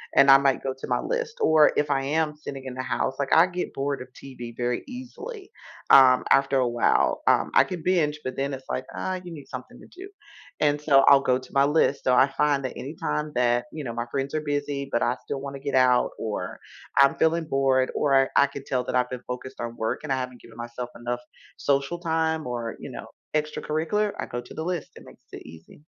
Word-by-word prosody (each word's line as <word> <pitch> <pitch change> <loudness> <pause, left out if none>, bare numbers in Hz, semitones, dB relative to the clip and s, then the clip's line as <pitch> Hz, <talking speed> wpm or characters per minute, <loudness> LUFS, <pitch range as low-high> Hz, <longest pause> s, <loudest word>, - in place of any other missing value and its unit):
and 140 - +6
I 135 - +10
might 135 -1 +1
go 135 - -2
to - - -7
my - - +1
list, 485 -1 -3
or 155 - +5
if 145 0 +1
I 135 -1 +1
am 150 +2 0
sitting 140 -3 -8
in 130 - -6
the 130 - -4
house, 130 +1 -2
like, 140 -1 -1
I 165 +3 +7
get 180 -1 -4
bored 140 0 -2
of 130 - -10
TV 125 -4 -9
very 120 0 -1
easily, 380 - -9 0.4
um, 130 -2 +7
after 135 0 +4
a 125 - +2
while, 120 0 +1
um, - - +3
I - - +8
could 180 -3 -6
binge, 155 -5 +1
but 130 0 -3
then 140 +1 -2
it's 130 0 -8
like, 130 - -3
uh, 185 -1 -3
"You 175 - -9
need 145 -4 -10
something 125 0 -9
to - - -14
do," 375 +2 -11 0.5
and, 145 -1 +2
so, 140 -3 +5
I'll 140 -1 +8
go 125 -1 +2
to 130 - -15
my 140 - +4
list. 145 -1 +2
So 130 - +3
I 130 +2 +6
find 140 0 +1
that 130 - -5
anytime 150 +1 -3
that, 120 0 +2
you 155 - -6
know, 115 - -4
my 120 0 -3
friends 140 +1 -2
are 155 - 0
busy, 145 -2 -3
but 120 - +1
I 120 - +1
still 140 - -4
wanna 140 0 -6
get 140 0 -3
out, 125 -1 +4
or 110 -2 -4 0.4
I'm 140 0 +6
feeling 160 +1 +1
bored, 135 -3 +2
or 135 -2 +3
I 140 - +6
could 140 -1 -9
tell 125 -1 -1
that - - -3
I've 125 0 +2
been 125 -1 -6
focused 125 0 -6
on 120 0 -5
work 110 - -2
and 150 - -4
I 135 - +2
haven't 125 -1 -5
given 115 - -15
myself 120 +1 -6
enough 120 +1 -4 0.4
social 140 +4 0
time 160 -2 0
or, 120 -2 -4
you - - -8
know, - - -8 0.3
extracurricular, 155 +7 -1
I - - -2
go 120 - -4
to 120 - -13
the 160 - -5
list. 175 -2 -3
It - - -13
makes - - -17
it - - -9
easy. 80 - -14
140 Hz, 235 wpm, -25 LUFS, 125-155 Hz, 0.5 s, I